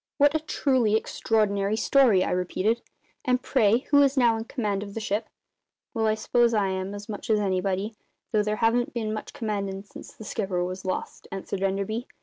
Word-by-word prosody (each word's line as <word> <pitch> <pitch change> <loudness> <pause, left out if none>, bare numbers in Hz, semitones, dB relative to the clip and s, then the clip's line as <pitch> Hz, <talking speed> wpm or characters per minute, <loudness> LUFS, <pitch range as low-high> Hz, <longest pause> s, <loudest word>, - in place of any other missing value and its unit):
"What 290 0 +5
a 315 - +2
truly 260 -7 +1
extraordinary 210 -2 +1
story!" 230 -7 +4
I - - -2
repeated. 185 +5 0 0.4
"And, 250 -1 +2
pray, 220 +4 +3
who 285 -1 +7
is 280 0 +3
now 240 -3 +5
in 225 0 -4
command 210 -6 -2
of 200 -1 -8
the - - -2
ship?" 210 +1 -2 0.6
"Well, 225 -2 +1
I 215 - +2
s'pose 235 +1 +2
I 200 -2 +2
am, 190 +1 -3
as 205 0 -8
much 210 0 -6
as 215 -1 +4
anybody 195 +1 -1 0.4
though 215 - +3
there 210 0 0
haven't 240 +2 +1
been 220 -2 -1
much 215 - -5
`commandin'' 200 -3 -3
since - - -11
the - - -12
skipper 190 -5 -1
was 185 +1 -5
lost," 185 - -4
answered 195 0 -4
Enderby. 200 +5 -1
215 Hz, 190 wpm, -26 LUFS, 195-230 Hz, 0.6 s, who